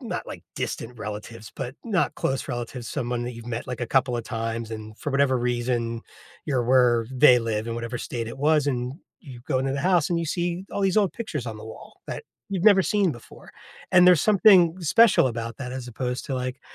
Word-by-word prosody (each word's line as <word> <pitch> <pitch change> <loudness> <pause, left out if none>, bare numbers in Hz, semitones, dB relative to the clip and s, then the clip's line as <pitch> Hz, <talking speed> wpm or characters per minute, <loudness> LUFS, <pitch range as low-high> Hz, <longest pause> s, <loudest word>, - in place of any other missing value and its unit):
not, - - -5
like, - - -8
distant 115 0 -4
relatives, 105 +1 -7
but 130 0 -5
not 200 -6 0
close 135 +2 -2
relatives 120 -1 -5
someone 120 0 -2
that 125 - -4
you've 115 0 -11
met, 120 0 -4
like, 125 -1 -5
a 120 - -2
couple 130 -1 +1
of 115 - -4
times, 115 -1 -4
and 110 0 -8
for 145 - -4
whatever 140 -1 +3
reason, 120 -1 -1 0.5
you're 130 -5 0
where 120 -2 +4
they 125 -1 +6
live, 110 -1 -2
and 115 - -3
whatever 120 +1 -4
state 115 -2 -4
it 115 - -8
was, 150 0 +3
and 125 -1 -2 0.3
you 130 -7 -11
go 130 -4 +1
into 135 +1 -1
the 140 - -2
house, 175 -2 +2
and 170 - +1
you 165 - -2
see 175 +2 -2
all 200 - -2
these 195 0 +1
old 200 -4 +3
pictures 155 - -5
on 110 -2 -5
the 110 - -10
wall 110 - -12
that - - -6 0.2
you've 190 -2 -2
never 200 -3 +7
seen 200 -5 +1
before, 120 - -14 0.4
and 180 0 +7
there's 180 -4 +7
something 190 -4 +5
special 190 - +5
about 115 -1 -4
that, 125 -2 -5
as 130 -2 -6
opposed 125 +1 -4
to, 135 - -3
like, 130 +1 -4
125 Hz, 220 wpm, -25 LUFS, 115-160 Hz, 0.5 s, never